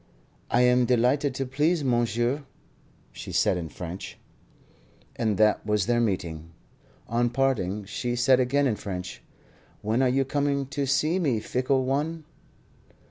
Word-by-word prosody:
"I 120 - +3
am 125 0 +4
delighted 125 +4 +2
to 135 - -2
please 150 +5 +1
monsieur," 120 +2 0 0.7
she - - -8
said - - +2
in 85 -2 -4
French. 90 +3 -7 1.0
And 110 -4 0
that 105 +1 +3
was 105 -3 0
their 120 +1 +2
meeting. 85 -6 -3 0.5
On 120 +1 +1
parting 110 -7 0
she 120 +4 -3
said 125 +1 +4
again 140 +3 +2
in 115 -6 0
French: 90 -10 -6 0.6
"When 110 +4 +1
are 130 - +3
you 135 +2 +1
coming 140 0 0
to 140 0 -2
see 155 +6 +1
me, 135 -10 +1
fickle 130 +3 0
one?" 150 +5 -1
125 Hz, 140 wpm, -26 LUFS, 105-135 Hz, 1.0 s, am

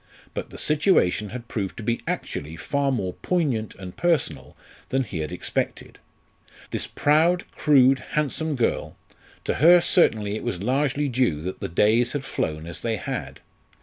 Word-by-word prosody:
But - - -5
the - - -10
situation 145 - +2
had 120 +1 -7
proved 100 -5 -4
to 115 - -6
be 115 +2 -1
actually 75 +3 -4
far 140 - 0
more 95 -8 -2
poignant 140 - 0
and 90 -2 -9
personal 125 - -1 0.3
than 135 0 +1
he 100 -8 -5
had 75 -1 -3
expected. - - -3 0.7
This - - -2
proud, 165 +5 +3
crude, 135 -2 +4
handsome 150 +1 0
girl 120 -3 -1 0.5
to - - 0
her 175 +3 +8
certainly 110 - +2
it - - -5
was 90 +1 -3
largely 140 +4 +1
due 125 - +1
that 90 +3 -5
the - - -4
days 110 +8 +3
had 140 -2 -3
flown 80 -8 -3
as 85 0 -7
they 115 -1 -1
had. - - -5
125 Hz, 160 wpm, -24 LUFS, 95-145 Hz, 0.7 s, her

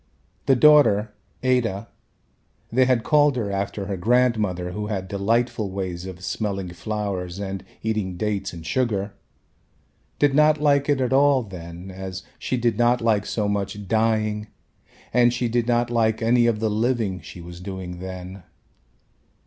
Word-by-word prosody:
The 135 - +6
daughter, 120 -7 +5 0.3
Ada 115 -5 +1 0.8
they 130 +2 +4
had 125 -3 +2
called 145 -3 +4
her 110 -5 -2
after 100 0 -3
her 100 -1 -3
grandmother 105 -4 +1
who 105 +3 -4
had 95 -3 -3
delightful 110 +2 0
ways 95 -2 -4
of 90 -1 -9
smelling 95 -2 -3
flowers 95 -3 -4
and 95 -1 -5 0.2
eating 105 -5 -2
dates 105 0 -2
and 85 -2 -10
sugar, 105 -1 -1 1.0
did 145 -2 +3
not 150 +1 +4
like 145 -1 +2
it 140 -2 +2
at 130 0 0
all 140 -1 +4
then 90 -2 -9
as 95 0 -7 0.2
she 130 - -1
did 120 -2 0
not 120 +1 +4
like 110 -3 +1
so 105 -2 -1
much 100 0 -3
dying 110 0 +1 0.7
and 120 0 +4
she 120 0 0
did 120 0 0
not 120 0 +1
like 110 -2 +2
any 120 +1 +3
of 115 -2 +1
the 110 0 0
living 110 -4 0
she - - -11
was 85 +1 -10
doing 90 -1 -6
then. 95 +1 -7
105 Hz, 155 wpm, -23 LUFS, 95-120 Hz, 1.0 s, The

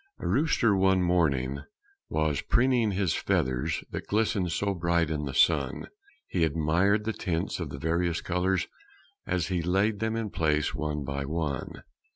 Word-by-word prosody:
A - - -8
rooster 130 -8 +2
one 95 -1 +3
morning 70 -7 +1 0.5
was 80 -2 0
preening 120 -2 +2
his 95 -4 0
feathers 65 -1 0
That - - -5
glistened 105 -4 +1
so 100 +3 0
bright 85 -2 +1
in 75 -1 -2
the 70 - -4
sun; 70 -6 +2 0.4
He 85 - 0
admired 85 +7 +2
the 110 +1 -2
tints 85 -6 -2
of - - -4
the - - -6
various 85 +2 0
colors 90 +1 0 0.6
As 90 0 -1
he 90 -2 0
laid 100 +5 +1
them 110 0 -1
in 110 -3 -3
place 75 -2 +1
one 75 -1 -3
by 70 0 -3
one. 75 -3 -3
85 Hz, 160 wpm, -28 LUFS, 75-100 Hz, 0.6 s, one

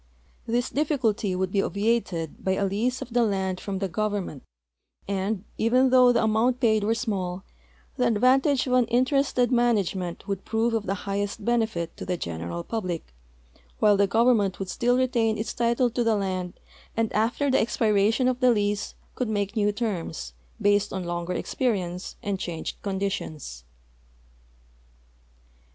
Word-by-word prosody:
This 240 +1 0
difficulty 250 - 0
would 185 0 -1
be 195 - +2
obviated 200 -7 -1
by 190 - +1
a 200 +1 0
lease 225 +6 -1
of 230 - -12
the 245 - +3
land 190 -4 0
from 195 0 -4
the 195 0 -1
government, 200 -6 -2 0.7
and, 200 0 -1 0.2
even 250 +3 +3
though 250 -1 +7
the 235 -1 +2
amount 225 +3 +2
paid 220 -4 +3
were 220 +2 +1
small, 190 -6 -3 0.5
the 250 -2 +2
advantage 255 +5 +3
of 255 - -1
an 250 -1 +4
interested 255 0 +2
manage 235 -6 +2
ment 180 0 -5
would 195 -2 -3
prove 225 +1 0
of 220 -3 -1
the 195 - 0
highest 200 +1 -3
benefit 220 -8 0
to - - -6
the 180 -1 -1
general 85 - -4
public, 180 - -4 0.6
while 210 -1 +5
the 200 0 +3
government 220 -4 +3
would 195 -1 -5
still 245 +5 +1
retain 235 -4 +1
its 215 0 -3
title 235 +1 +1
to 240 +1 0
the 225 -1 +2
land 185 -3 -2 0.4
and 225 -1 0
after 240 +6 +1
the - - +4
expiration 220 +1 +2
of 255 -1 0
the 255 -1 +4
lease 205 -2 0 0.2
could 250 -3 -2
make 205 0 -1
new 210 -1 +2
terms, 175 - -4 0.3
based 205 0 +2
on 190 -1 -3
longer 175 +1 -3
experience 185 -7 -2
and 200 -2 -2
changed 170 -3 -5
conditions. 190 - -4
210 Hz, 160 wpm, -26 LUFS, 190-240 Hz, 0.7 s, though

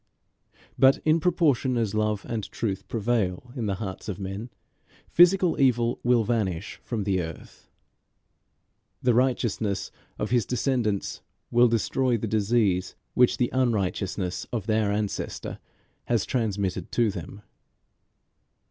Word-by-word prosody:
But 135 +1 +6
in 155 +1 +4
proportion 150 -7 +2
as 110 -3 0
love 105 -1 0
and 110 -3 -3
truth 100 -4 -3
prevail 115 -1 -1
in 115 -5 -2
the 100 - 0
hearts 95 0 -6
of 95 - -3
men, 100 +4 -5 0.6
physical 175 -2 +4
evil 120 -3 +2
will 120 -2 +3
vanish 105 -6 -2
from 115 -4 -3
the 95 -2 +1
earth. 80 -1 -9 1.3
The 125 - +4
righteousness 115 -5 0 0.3
of 105 - -3
his 120 -5 +2
descendants 120 -6 -1 0.3
will 120 +1 +6
destroy 120 +2 +1
the 115 - -3
disease 105 -3 +1 0.2
which 125 -1 +4
the 125 - +1
unrighteousness 100 -6 -1
of 115 -5 -3
their 110 -2 +1
ancestor 105 -1 -3 0.5
has 115 -4 +1
transmitted 105 -7 -2
to 115 -3 +2
them. 100 +2 -8
110 Hz, 125 wpm, -26 LUFS, 100-125 Hz, 1.3 s, But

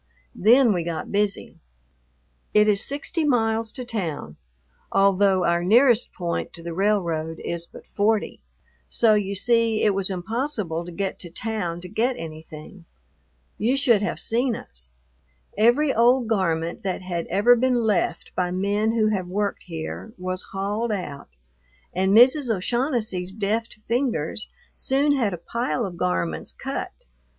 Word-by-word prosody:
Then 235 +3 +5
we 175 -2 -1
got 165 -1 -4
busy. 205 0 -1 1.0
It 210 0 +6
is 205 -1 +3
sixty 290 +4 -1
miles 225 -5 +1
to 255 -2 -5
town, 165 - -4 0.5
although 195 -1 +3
our 170 0 +1
nearest 240 +4 +4
point 170 -2 -3
to 165 - -10
the 170 0 -5
railroad 170 -5 0
is 170 0 -3
but - - -14
forty, 210 +1 0 0.5
so 225 -2 +4
you 200 -1 0
see 230 +1 +2
it 210 - +4
was 195 0 0
impossible 195 - -2
to 175 - -8
get 195 +2 -3
to 175 - -9
town 175 -3 -4
to 180 - -8
get 230 +6 0
anything. 160 +2 -10 0.7
You 245 +6 +1
should 240 -7 +4
have 210 - -2
seen 240 +1 0
us! 60 - -9 0.6
Every 250 +7 +3
old 240 +1 +4
garment 170 -6 -1
that 190 -1 -3
had 175 -2 -3
ever 230 +5 +4
been 255 +1 +2
left 210 -4 0
by 180 -1 0
men 200 +4 0
who 220 -2 +2
have 190 -4 -1
worked 200 +2 -2
here 165 +6 -6
was 185 0 -4
hauled 205 +4 -2
out, 150 - -5 0.6
and 190 +1 +1
Mrs. 255 +2 +6
O'Shaughnessy's 220 -3 -1
deft 220 +2 -2
fingers 230 - -1 0.2
soon 280 +2 +1
had 230 -7 +1
a 175 - -4
pile 235 +6 -2
of 185 -3 -6
garments 85 - -2
cut. - - -5
205 Hz, 145 wpm, -24 LUFS, 175-230 Hz, 1.0 s, It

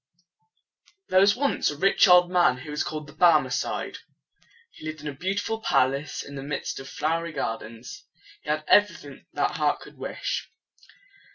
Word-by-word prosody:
There 185 - +5
was 200 +1 +5
once 280 +2 +1
a 145 - -6
rich 195 +5 +4
old 180 -1 +6
man 175 -8 +3
who 140 +4 -9
was 150 - -1
called 155 -1 -5
the 145 - -14
Bar 170 -1 +6
me 130 -2 -6
cide. 125 - -3 0.7
He - - -16
lived 155 0 -6
in 150 - -7
a 145 - -4
beautiful 200 +8 -3
palace 140 -4 0
in 140 - -11
the 135 - -6
midst 140 +1 -4
of 135 0 -9
flowery 165 +3 -2
gardens. 115 -1 -6 0.4
He - - -10
had 155 0 0
every 205 -4 +5
thing 140 -3 -13
that - - -1
heart - - +1
could - - -14
wish. - - -4
155 Hz, 180 wpm, -25 LUFS, 140-180 Hz, 0.7 s, old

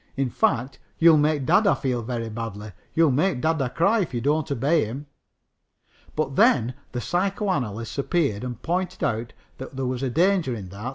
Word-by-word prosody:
In 135 -3 0
fact, 125 +5 0 0.2
you'll 160 -2 +6
make 150 -2 +1
dada 195 +7 +4
feel 125 -4 -2
very 115 0 -4
badly. 110 -2 -6 0.2
You'll 160 -3 +4
make 150 +2 +1
dada 160 -3 0
cry 200 - +2
if 175 -10 -2
you - - 0
don't 145 +4 0
obey 145 +5 +2
him." 130 +7 -6 1.1
But 145 -3 -1
then 125 -1 +4 0.2
the 125 - -3
psychoanalysts 150 - -2
appeared 140 - 0
and 120 -3 -5
pointed 180 +2 -2
out 115 +1 -1 0.3
that 130 +1 -8
there 135 0 -2
was 125 0 -2
danger 160 +1 +1
in 95 -5 -8
that. 100 +6 -6
135 Hz, 170 wpm, -24 LUFS, 120-165 Hz, 1.1 s, you'll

